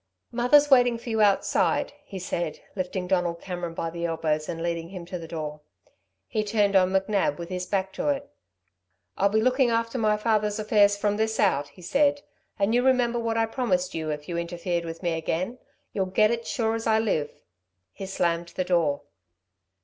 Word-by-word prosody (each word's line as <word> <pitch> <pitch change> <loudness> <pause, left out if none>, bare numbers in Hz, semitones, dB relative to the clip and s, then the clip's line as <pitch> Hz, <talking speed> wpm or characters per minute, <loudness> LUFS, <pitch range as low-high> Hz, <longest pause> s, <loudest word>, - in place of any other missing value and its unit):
"Mother's 280 +5 +4
waiting 245 -2 +5
for 235 0 -7
you 220 -1 +1
outside," 200 +5 +2
he 205 -9 -8
said, 175 -3 -3 0.2
lifting 185 -1 -3
Donald 180 -2 0
Cameron 175 -2 -5
by 165 0 -3
the 170 0 -4
elbows 155 -2 -1
and 165 0 -4
leading 170 -1 -2
him 180 -2 -8
to 180 +1 -6
the 165 - -8
door. 150 -2 -5 0.7
He 215 -2 -1
turned 205 -1 +1
on 185 -1 +5
McNab 195 -4 +1
with 170 0 -7
his 180 -1 -4
back 190 -1 -1
to - - -3
it. 280 0 -1 0.9
"I'll 200 - +3
be 215 +2 +2
looking 255 0 +3
after 230 +2 0
my 215 -1 +2
father's 210 -1 +1
affairs 205 -1 +3
from 205 0 0
this 220 0 0
out," 145 -8 +2
he 180 - -16
said. 285 - +2 0.3
"And 200 +2 +1
you 245 - +4
remember 245 -2 +2
what 230 -1 -1
I 225 - +3
promised 190 -6 -1
you 160 -1 -3
if 150 0 -4
you 170 -1 -2
interfered 170 0 -2
with 165 +2 -7
me 170 -1 +1
again... 175 +8 -2 0.3
you'll 190 -2 0
get 215 +4 +3
it 230 -1 -3
sure 225 -2 0
as 225 0 -3
I 220 -1 +4
live." 205 -9 0 0.6
He 195 - -7
slammed 170 -2 -1
the 185 - 0
door. 170 -6 +1
195 Hz, 195 wpm, -26 LUFS, 170-225 Hz, 0.9 s, waiting